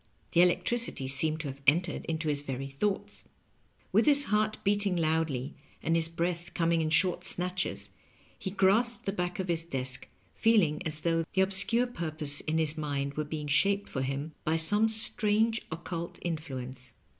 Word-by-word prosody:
The 170 - +5
electricity 180 - +1
seemed 155 +4 +2
to 150 - -5
have 135 0 -7
entered 165 +4 +2
into 160 -1 -3
his 145 -1 0
very 135 -1 -5
thoughts. 165 +9 -3 0.7
With - - +3
his 285 -1 +7
heart 215 -2 0
besting 205 -2 +1
loudly 155 -5 0 0.3
and 165 - +1
his 165 -1 +1
breath 170 +1 -3
coming 165 -1 +2
in 155 - 0
short 170 +3 +3
snatches, 180 0 -1 0.5
he 190 - -4
grasped 210 +5 +2
the 195 - 0
back 180 -2 -3
of 190 - -3
his 165 -1 0
desk, 130 -5 -4 0.3
feeling 205 -10 +2
as 155 0 -3
though 165 0 +1
the 190 - +3
obscure 195 +5 +2
purpose 155 - -2
in 160 +1 -1
his 155 -1 +1
mind 140 -2 -2
were 155 - -2
being 150 0 -5
shaped 200 +7 +2
for 130 - -3
him 135 +4 -3
by 155 - +1
some 205 +7 +4
strange 220 0 +2
occult 170 +1 -5
influence. 130 -7 -5
165 Hz, 170 wpm, -29 LUFS, 150-195 Hz, 0.7 s, his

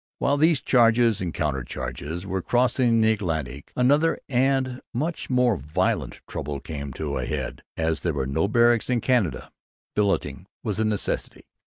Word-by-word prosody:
While 140 +1 +1
these 155 -2 +4
charges 115 -3 +4
and 90 -2 -2
counter 75 -6 -1
charges 70 +8 -5
were 95 -1 -2
crossing 120 +1 +2
the 110 0 +4
Atlantic 80 - -3
another, 145 +6 +3
and 130 -1 +1
much 155 +7 -2
more 125 -4 +3
violent, 75 +3 -1
trouble 70 -1 -4
came 70 -2 -6
to 70 +2 -3
a 60 - -2
head. - - -4 0.2
As 80 0 0
there 85 - -1
were 65 -2 -1
no 70 +7 0
barracks 120 +2 +3
in 125 -1 +2
Canada 120 -7 0 0.4
billeting 100 -2 0 0.2
was 105 -3 -2
a 110 - +2
necessity. 105 -2 -2
105 Hz, 160 wpm, -25 LUFS, 80-125 Hz, 0.4 s, these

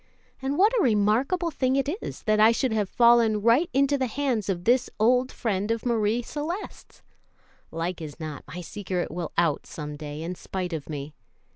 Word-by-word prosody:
And 270 +2 -1
what 420 +5 +5
a - - +3
remarkable 245 - +2
thing 260 -2 0
it 275 0 +1
is - - -7
that 215 -1 +2
I 220 +1 +7
should 235 +1 0
have 210 -3 0
fallen 235 -3 +4
right 245 +10 +4
into 275 0 +2
the 260 - +1
hands 245 -5 -1
of 175 -2 -2
this 250 +4 +3
old 250 +4 +3
friend 205 -2 -2
of 230 +1 -1
Marie 230 0 +1
Celeste's! 320 - -6 0.7
Like 165 +1 -4
as 150 0 -8
not 155 -2 -6
my 180 - -7
secret 185 0 -4
will 175 -1 -4
out 165 -4 +1
some 150 -1 -6
day 150 +1 -6
in 175 +2 -3
spite 180 0 -5
of 155 -2 -5
me. 145 0 -6
220 Hz, 185 wpm, -26 LUFS, 175-260 Hz, 0.7 s, I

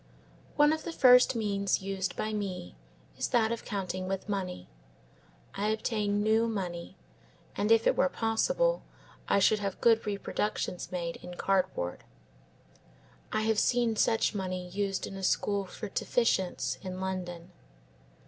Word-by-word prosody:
One 295 +1 +5
of 315 - -3
the 340 - -4
first 250 -4 +6
means 200 -3 0
used 195 -2 -2
by 215 0 -2
me, 190 - -4 0.4
is - - 0
that 225 -2 +2
of 235 - -3
counting 185 -2 -3
with 195 +1 -3
money. 185 - -3 0.9
I 205 +1 -1
obtain 210 -1 0
new 220 +2 +3
money, 180 -6 -4 0.6
and 210 +2 0
if 225 0 +5
it - - +4
were 275 - +3
possible - - +1 0.5
I - - +3
should 210 +2 +4
have 200 -2 -3
good 225 -2 +4
reproductions 200 -2 -2
made 170 -2 -3
in 180 - -9
cardboard. 185 - -1 1.3
I 215 - 0
have 220 -1 +2
seen 240 -2 +2
such 225 +1 +2
money 185 -2 -3
used 195 +1 -2
in - - -8
a 195 - -6
school 200 +1 +1
for 210 +3 -7
deficients 185 - 0
in 185 0 -6
London. 180 -2 -4
200 Hz, 145 wpm, -30 LUFS, 185-225 Hz, 1.3 s, first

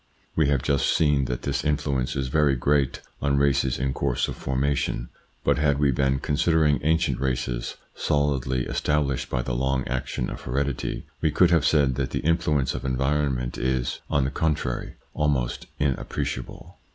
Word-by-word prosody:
We 80 -3 +3
have 70 -3 +1
just 70 -1 +1
seen 75 -4 +3
that 60 -1 -3
this 70 -1 -1
influence 70 -4 0
is 65 -1 -1
very 75 -1 +3
great 70 +1 +1 0.2
on 70 0 +2
races 70 -2 +2
in 65 0 -1
course - - 0
of - - -5
formation; 65 -2 -1 0.3
but - - +2
had 75 -2 +2
we 70 -1 +3
been 65 +1 +1
considering 75 +1 +2
ancient 80 +3 +1
races 60 -2 -2 0.2
solidly 70 -4 0
established 75 -4 0
by 60 -1 -1
the - - -3
long 65 +1 0
action 60 0 -2
of - - -7
heredity, 70 +1 -2 0.2
we 80 - +3
could 85 +4 +4
have 80 -3 +4
said 70 -4 +3
that 65 -2 -1
the - - -2
influence 75 -5 +1
of - - -5
environment 65 -1 0
is, 65 -1 -1
on 70 - +2
the 70 - -1
contrary, 75 -7 -1 0.2
almost 70 -5 0
inappreciable. 65 -2 -3
70 Hz, 165 wpm, -25 LUFS, 65-75 Hz, 0.3 s, could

